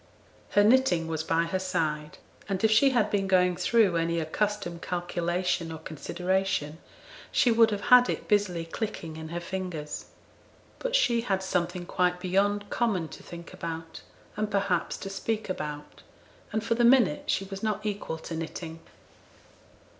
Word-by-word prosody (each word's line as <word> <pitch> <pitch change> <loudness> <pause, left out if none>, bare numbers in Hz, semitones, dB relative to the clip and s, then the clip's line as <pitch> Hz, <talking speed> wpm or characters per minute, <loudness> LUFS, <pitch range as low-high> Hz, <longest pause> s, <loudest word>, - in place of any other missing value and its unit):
Her 205 - +8
knitting 220 -7 +4
was 160 -1 -2
by 165 +1 +2
her 170 +3 -1
side; 155 -5 -2 0.3
and 195 0 -2
if 220 - +4
she 245 +6 +6
had 235 -5 +1
been 195 -1 +1
going 180 -1 +3
through 190 0 +3
any 165 0 0
accustomed 175 +1 -2
calculation 175 -1 -1
or 160 - -5
consideration 170 0 -2 0.5
she 245 - +4
would 230 0 +6
have 205 -2 -2
had 250 0 +8
it - - -3
busily 195 -6 +1
clinking 165 -3 -5
in 160 0 -7
her 170 +1 -3
fingers. 175 -4 -5 0.7
But - - -1
she 235 - +3
had 195 -5 -1
something 175 -1 -1
quite 180 0 +1
beyond 200 +3 +1
common 195 -9 0
to - - -11
think 170 -1 -10
about, 165 -1 -6 0.3
and, 215 0 -1
perhaps, 195 -4 0
to 195 - -6
speak 215 +2 -3
about; 150 -4 -5 0.5
and 220 0 -1
for 230 - +1
the 240 +1 +1
minute 265 +4 +4
she 195 - +1
was 195 0 -7
not 215 -1 -2
equal 205 -6 -3
to 165 +1 -7
knitting. 165 0 -6
185 Hz, 160 wpm, -28 LUFS, 165-210 Hz, 0.7 s, Her